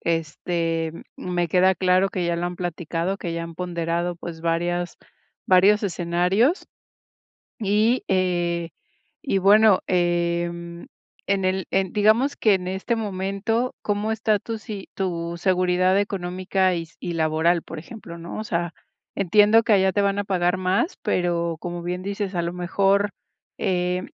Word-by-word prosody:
Este, 165 0 -1 0.3
mm, - - -7
me 175 -1 0
queda 185 +2 +4
claro 185 +2 +3
que 185 -2 -3
ya 170 - 0
lo 170 +1 -1
han 175 0 -5
platicado, 175 +1 -3
que 170 -2 -4
ya 170 - -3
han 165 0 -7
ponderado, 170 0 -2
pues, 165 -1 -8
varias 175 +1 -1 0.5
varios 195 +3 +5
escenarios. 185 - +1 0.9
Y, 215 +4 +2
eh, 175 -2 0 0.5
y 195 -8 +1
bueno, 205 0 +6
em, 170 -1 -1 0.4
en 195 -1 +1
el 185 -1 0
en, 190 -1 +1
digamos 220 +7 +3
que, 215 - +3
en 180 -1 -1
este 190 +5 -1
momento, 210 +3 -2
¿cómo 210 +1 -1
está 220 -1 +1
tu 225 +2 -6
si 210 -3 -8
tu 170 -3 -3
seguridad 185 +1 +2
económica 185 -1 0
y 170 - -2
s 165 - -18
y 175 - -4
laboral? 160 +1 +1
Por 165 - -8
ejemplo, 170 -2 -10
¿no? 170 +5 -7
O 215 - -3
sea, 175 -3 -2 0.4
entiendo 210 +4 +5
que 220 - +3
allá 190 -1 +4
te 205 - +1
van 200 0 +1
a 205 - 0
pagar 180 -2 +1
más, 185 - 0
pero, 170 -2 0
como 175 0 -5
bien 180 +1 -4
dices, 200 -1 -3
a 170 - 0
lo 170 - -3
mejor, 195 +3 +1 0.5
eh, 180 0 0
180 Hz, 155 wpm, -23 LUFS, 170-200 Hz, 0.9 s, bueno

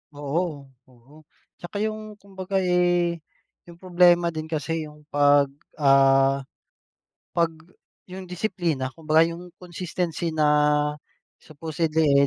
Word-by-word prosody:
Oo, 145 +2 -2 0.5
oo. 130 +2 -22 0.5
Tsaka 175 +3 -7
yung 215 0 -5
kumbaga, 195 -1 -8
eh, 175 -1 +1 0.5
yung 170 - -12
problema 175 -1 +3
din 155 -1 -6
kasi 160 0 -3
yung 150 0 -16
pag 145 -1 +4 0.2
ah, 135 -1 +4 0.9
'pag 170 -1 +1 0.6
yun 185 0 -8
disiplina, 175 -7 -2
kumbaga 155 +2 +2
yung 175 +1 -10
consistency 175 -2 -4
na 155 -1 +2 0.9
supposedly, 155 -2 +1
165 Hz, 105 wpm, -24 LUFS, 145-180 Hz, 0.9 s, pag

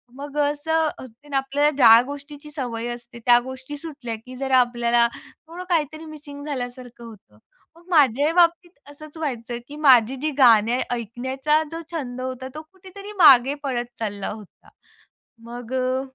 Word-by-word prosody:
मग 285 +1 -8
अ, 295 - +3
असं, 320 +1 0 0.2
ते 275 +4 -11
आपल्याला 275 +2 +2
ज्या 230 -2 +8
गोष्टीची 285 +1 -9
सवय 240 -5 -4
असते, 240 0 -12
त्या 240 -1 +6
गोष्टी 260 +3 -8
सुटल्या 280 -7 -7
की 255 0 -10
जरा 265 -1 +2
आपल्याला 240 -1 +2 0.4
थोडं 350 +2 -8
काहीतरी 315 -1 -1
मिसिंग 290 -2 -10
झाल्यासारखं 245 -3 -6
होतं. 195 - -15 0.4
मग 340 +1 -20
माझ्याही 290 -1 +3
बाबतीत 345 0 +3 0.2
असंच 305 +2 -13
व्हायचं 245 -6 -4
की 290 - -10
माझी 260 -4 +5
जी 310 - 0
गाणे 235 -1 +5
ऐकण्याचा 260 +6 -1
जो 330 +1 -5
छंद 255 -6 -5
होता, 260 0 -5
तो 310 - -6
कुठेतरी 385 +2 -12
मागे 270 -5 +7
पडत 245 -3 -2
चालला 205 -3 -4
होता. 210 -3 -12 0.7
मग 240 +1 -9
अ, 255 0 0
265 Hz, 150 wpm, -23 LUFS, 240-300 Hz, 0.7 s, ज्या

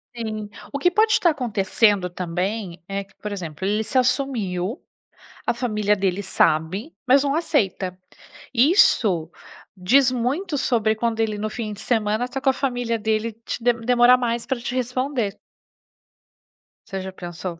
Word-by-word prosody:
Sim. 215 -2 -4 0.2
O 280 - -2
que 355 +6 +2
pode 435 +3 +3
tá 340 - +4
acontecendo 205 -6 +1
também, 180 +2 -3
é 200 0 -3
que, 195 - -26
por 210 - -6
exemplo, 175 -3 -5
ele 210 +2 +1
se 220 +5 -2
assumiu, 245 - 0 0.7
a - - +2
família 215 -4 0
dele 195 0 -1
sabe, 175 - +1
mas 270 +2 +5
não 280 0 0
aceita. 200 - 0 0.6
Isso 230 - +4 0.5
diz 245 +8 +4
muito 280 +7 -1
sobre 220 -5 +1
quando 225 0 -1
ele 215 -2 0
no 215 +1 -2
fim 215 -2 -4
de 205 - -10
semana 220 0 0
tá 270 - -4
com 270 - +2
a - - +3
família 245 -4 -1
dele 220 +1 -1
te - - -4
demorar 240 +1 +4
mais 235 -1 -2
pra 265 - -1
te 245 +2 -4
responder. 250 -3 -1 1.5
Você 195 -1 -5
já 190 0 -6
pensou 175 -1 -7
225 Hz, 155 wpm, -23 LUFS, 195-250 Hz, 1.5 s, mas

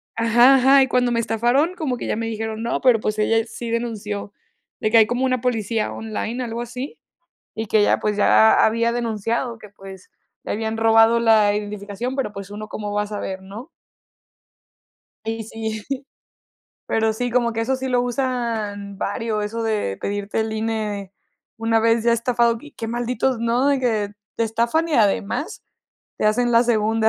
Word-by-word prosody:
ajá, 240 +4 +5
ajá 270 +1 +6
y 265 - +3
cuando 250 -1 +1
me 235 - +1
estafaron, 240 +10 +1
como 280 -8 -2
que - - -5
ya - - 0
me 225 +1 -3
dijeron: 220 0 -4
"No, 235 - -1
pero, 250 -4 +4
pues, 215 0 -2
ella 225 +1 +2
sí 230 +1 -7
denunció". 210 -3 -4 0.5
De 215 - 0
que 230 - +5
hay 220 - +7
como 245 +2 0
una 255 -2 0
policía 225 -3 -1
online, 225 +2 -4
algo 230 0 -5
así. 250 - -6 0.6
Y 220 0 -4
que 215 0 +3
ya, - - +3
pues, 210 -1 -1
ya 110 - +5
había 230 +1 +2
denunciado 230 +1 -2
que, 210 - -13
pues, 195 -1 -13 0.3
le - - -3
habían 220 +1 -2
robado 225 +1 +5
la 215 -3 +4
identificación, 210 +4 -4
pero, 265 -6 -2
pues, 200 0 -8
uno 210 +1 -7
cómo 210 -1 -5
va 205 - +1
a 210 - -4
saber, 195 -2 -5
¿no? 210 - -10 1.6
Sí, 225 0 -3
sí, 220 -1 -5 1.1
pero 220 0 +1
sí, 245 +3 -2
como 235 -1 +1
que 225 - -1
eso 265 +4 0
sí 260 0 -4
lo 250 -1 +2
usan 230 -6 -3
varios, 215 +1 -2
eso 230 +2 -4
de 210 - -1
pedirte 205 +1 -2
el 220 0 -1
INE 215 -3 -3 0.4
una 225 0 +2
vez 230 0 +2
ya 235 - +3
estafado, 235 0 +2 0.2
qué 225 - -5
malditos, 245 +2 -1
¿no?, 235 +4 +1
de 280 -1 +2
que 220 -5 0 0.3
te 230 - 0
estafan 235 +9 0
y 310 - -2
además 210 -1 0 0.6
te - - +1
hacen 240 +3 +2
la 230 +1 +6
segunda. 220 -1 +2
225 Hz, 180 wpm, -22 LUFS, 215-240 Hz, 1.6 s, hay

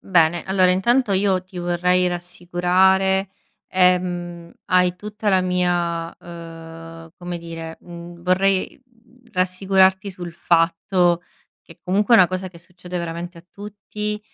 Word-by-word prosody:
Bene, 170 -2 +2
allora 185 -1 +3
intanto 230 +4 +2
io 190 -1 +1
ti 185 -1 -10
vorrei 180 +1 +1
rassicurare. 180 +2 +1 0.4
Ehm, 180 -2 0
hai 180 -1 +2
tutta 210 +1 -5
la 190 -2 +4
mia, 175 -2 -1
uhm 165 -1 -10 0.3
come 175 -1 -6
dire, 165 -1 -8
mhmm, 170 0 -11
vorrei, 190 +4 +1
mhmm, 245 0 -28
rassicurarti 190 +1 +2
sul 175 -2 -8
fatto 170 +1 +1 0.4
che - - -17
comunque 200 +6 +2
è - - +8
una 180 - +7
cosa 185 +1 -4
che 170 - -15
succede 180 +1 -8
veramente 170 +1 -6
a 165 - -16
tutti. 210 +1 -6
180 Hz, 130 wpm, -21 LUFS, 175-190 Hz, 0.4 s, è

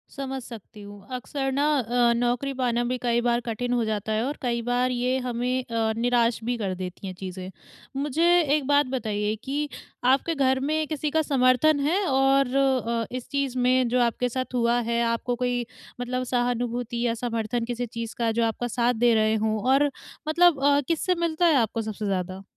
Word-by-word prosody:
समझ 270 -1 -4
सकती 215 -3 -11
हूँ। 205 -1 -12
अक्सर 270 +2 -3
ना 280 +2 +1
अ, 240 0 +2
नौकरी 245 +3 0
पाना 245 -2 0
भी 250 +1 -1
कई 240 0 +2
बार 240 0 +1
कठिन 245 +2 -2
हो 240 - +1
जाता 215 0 -2
है, 215 +2 +1
और 285 +3 -3
कई 235 -2 -1
बार 245 +1 0
ये 250 +1 0
हमें 250 +1 -1
अ, 225 -2 -1
निराश 240 -1 +2
भी 245 +1 -1
कर 195 -4 -2
देती 185 +1 -7
हैं 185 - -5
चीज़ें। 185 -1 -6 0.5
मुझे 295 +3 +1 0.3
एक 285 -3 -2
बात 290 0 +4
बताइए 215 -4 -2
कि 290 +2 -2 0.4
आपके 275 +6 +3
घर 265 -1 +2
में 310 +3 -1
किसी 305 -1 -2
का 320 - +2
समर्थन 280 +1 +3
है 340 +8 +1
और 270 -1 +2
अ, 250 -4 +1
इस 255 - -6
चीज़ 275 -2 -1
में 255 0 +3
जो 250 +1 +1
आपके 240 +1 +1
साथ 255 +1 -4
हुआ 240 0 +2
है, 235 0 0
आपको 230 +1 -1
कोई 245 -1 -1 0.4
मतलब 255 +1 -2
सहानुभूति 245 -1 -1
या 230 - +1
समर्थन 230 0 -2
किसी 245 0 -3
चीज़ 230 0 -6
का 230 -1 +1
जो 230 +1 0
आपका 230 +2 -2
साथ 245 +1 +1
दे 240 +1 +3
रहे 220 0 +3
हों? 220 0 0
और 275 +3 +3 0.4
मतलब 335 -1 +4
अ, 285 0 +4
किससे 340 +2 +1
मिलता 340 0 0
है 325 -4 +5
आपको 225 -2 +1
सबसे 215 -1 -5
ज़्यादा? 185 0 -3
245 Hz, 195 wpm, -25 LUFS, 230-270 Hz, 0.5 s, है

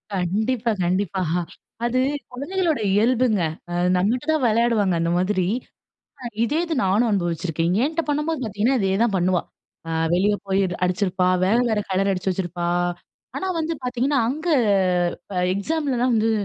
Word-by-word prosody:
கண்டிப்பா, 220 +6 0
கண்டிப்பா. 185 +1 0 0.6
அது 250 +2 +1 0.3
குழந்தைகளோட 320 +4 -1 0.2
இயல்புங்க. 230 -2 +2 0.3
அ - - -3 0.2
நம்மட்ட 225 +7 0
தான் 310 -3 +1
விளையாடுவாங்க 220 -4 +2
அந்த 170 0 0
மாதிரி. 185 0 +1 1.0
இதே 295 +7 0
இது 330 -2 -2
நானும் 210 +5 +2
அனுபவிச்சிருக்கேன். 170 -2 -1
என்ட்ட 320 +3 -1
பண்ணும்போது 300 +1 -1
பார்த்தீங்கன்னா, 220 +5 +1
இதே 190 0 +1
தான் 225 -4 +1
பண்ணுவா. 180 0 +1 0.5
அ - - -4 0.2
வெளியே 205 +3 +2
போய் 195 0 +1 0.2
அடிச்சிருப்பா, 185 0 +1 0.2
வேற 205 +5 +3
வேற 220 - +1
கலர் 195 +1 +1
அடிச்சு 190 0 -1
வச்சிருப்பா. 175 -2 -3 0.7
ஆனா 380 - -3
வந்து 325 +1 -1
பார்த்தீங்கன்னா, 255 +3 +1
அங்க 315 +5 -4 1.1
எக்ஸாமலலாம் 255 +1 0
வந்து 225 +1 +2
210 Hz, 130 wpm, -23 LUFS, 185-255 Hz, 1.1 s, வேற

